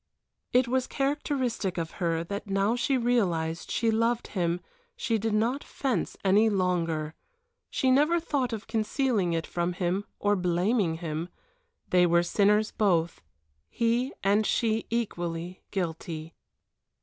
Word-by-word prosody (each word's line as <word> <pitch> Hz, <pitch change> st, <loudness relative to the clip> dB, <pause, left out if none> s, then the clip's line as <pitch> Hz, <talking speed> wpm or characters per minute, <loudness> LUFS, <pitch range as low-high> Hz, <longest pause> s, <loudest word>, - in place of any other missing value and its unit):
It 250 Hz, 0 st, +4 dB
was 255 Hz, +1 st, 0 dB
characteristic 270 Hz, -, -1 dB
of 165 Hz, -1 st, -2 dB
her 165 Hz, -1 st, +1 dB
that 200 Hz, +4 st, -5 dB
now 195 Hz, +4 st, +2 dB
she 260 Hz, +2 st, +1 dB
realized 175 Hz, -10 st, 0 dB
she 230 Hz, -1 st, +1 dB
loved 230 Hz, +1 st, +1 dB
him 175 Hz, -3 st, 0 dB, 0.4 s
she 225 Hz, -2 st, 0 dB
did 220 Hz, 0 st, 0 dB
not 240 Hz, +6 st, +1 dB
fence 255 Hz, -10 st, -2 dB
any 205 Hz, +4 st, +5 dB
longer, 170 Hz, -5 st, 0 dB, 0.6 s
she 260 Hz, -, +1 dB
never 300 Hz, +6 st, +4 dB
thought 280 Hz, -7 st, -1 dB
of 220 Hz, -2 st, -5 dB
concealing 220 Hz, -4 st, 0 dB
it 165 Hz, -1 st, -1 dB
from 175 Hz, +1 st, -2 dB
him 185 Hz, +2 st, -1 dB
or 205 Hz, 0 st, +2 dB
of 195 Hz, -, -1 dB
blaming 180 Hz, +1 st, +1 dB
him. 165 Hz, 0 st, -4 dB, 0.6 s
They 180 Hz, -1 st, +5 dB
were 170 Hz, 0 st, +4 dB
sinners 210 Hz, +4 st, +3 dB
both, 175 Hz, -5 st, +1 dB, 0.5 s
he 235 Hz, +3 st, +1 dB
and 200 Hz, +2 st, +3 dB
she 220 Hz, 0 st, 0 dB
equally 175 Hz, -6 st, -3 dB
guilty. 165 Hz, -3 st, -4 dB
205 Hz, 135 wpm, -28 LUFS, 175-235 Hz, 0.6 s, any